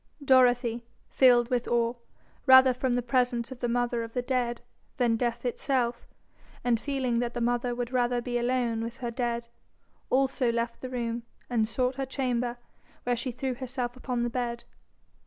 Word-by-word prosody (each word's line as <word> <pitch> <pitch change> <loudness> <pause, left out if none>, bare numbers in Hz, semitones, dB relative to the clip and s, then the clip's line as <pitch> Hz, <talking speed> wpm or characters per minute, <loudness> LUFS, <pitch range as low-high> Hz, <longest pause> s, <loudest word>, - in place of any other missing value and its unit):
Dorothy, 245 -3 +4 0.3
filled 245 -2 +5
with 245 -1 0
awe, 235 0 +2 0.5
rather 260 0 +8
from 250 0 0
the 245 - 0
presence 245 0 0
of 260 - -8
the 245 - -1
mother 240 0 0
of 230 0 -7
the 250 - -1
dead 245 -2 -1 0.4
than 240 -3 +3
death 235 +1 -2
itself, 245 -1 -1 0.6
and 240 -2 +2
feeling 260 -3 -1
that 240 0 -2
the - - -1
mother 240 +1 0
would 245 0 -3
rather 245 -1 +1
be 240 0 -2
alone 240 -2 0
with 230 +2 -6
her 240 -2 -4
dead, 235 -1 -2 0.6
also 260 -2 +2
left 235 0 -2
the 255 - -5
room, 235 -2 -2 0.3
and 225 -3 +2
sought 250 +3 -1
her 270 - -1
chamber, 245 -2 -1 0.5
where 245 0 +1
she 240 +2 -3
threw 255 +2 -3
herself 250 -1 -4
upon 250 -1 -2
the 240 - -1
bed. 235 -1 -3
245 Hz, 175 wpm, -28 LUFS, 235-255 Hz, 0.6 s, rather